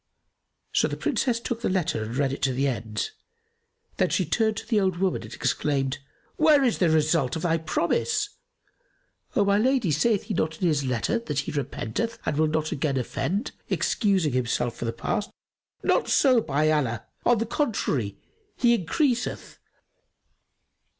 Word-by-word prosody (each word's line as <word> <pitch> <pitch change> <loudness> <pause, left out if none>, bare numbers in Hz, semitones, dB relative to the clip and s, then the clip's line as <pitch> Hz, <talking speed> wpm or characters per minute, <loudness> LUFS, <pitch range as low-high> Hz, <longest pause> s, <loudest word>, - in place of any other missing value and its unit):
So - - +3
the - - -4
Princess 240 -3 0
took 235 0 -4
the - - 0
letter 175 - 0
and 115 +3 -4
read 140 -1 +1
it - - -6
to 135 -1 +1
the 135 +2 +1
end; 110 - -3 0.9
then - - +2
she - - +1
turned 220 -2 +1
to - - -5
the 220 -4 +3
old 190 -3 +1
woman 190 0 0
and - - -10
exclaimed, 135 -2 -1 0.4
"Where 305 -3 +5
is 245 -4 +1
the 175 - +4
result 155 -4 +2
of 160 - -4
thy 165 -2 +2
promise?" 415 - 0 1.1
"O - - +3
my 200 +1 +3
lady, 250 - +2
saith 200 +8 +2
he 220 - -4
not 160 -3 -1
in 180 - +2
his 150 -3 +1
letter 130 - 0
that 150 -11 -2
he - - -5
repenteth 145 - -3
and 150 - 0
will 155 0 +3
not 155 0 -1
again 145 -3 -1
offend, 160 - -2 0.2
excusing 190 - +1
himself 120 -1 0
for - - -5
the 115 - 0
past?" 210 - -2 0.5
"Not - - +2
so, 255 -4 +5
by 150 -2 +1
Allah!: 125 -8 0 0.2
on 240 - +4
the 225 - 0
contrary, 155 - -1 0.4
he 240 -1 +4
increaseth." 245 - -1
160 Hz, 170 wpm, -26 LUFS, 135-225 Hz, 1.1 s, Where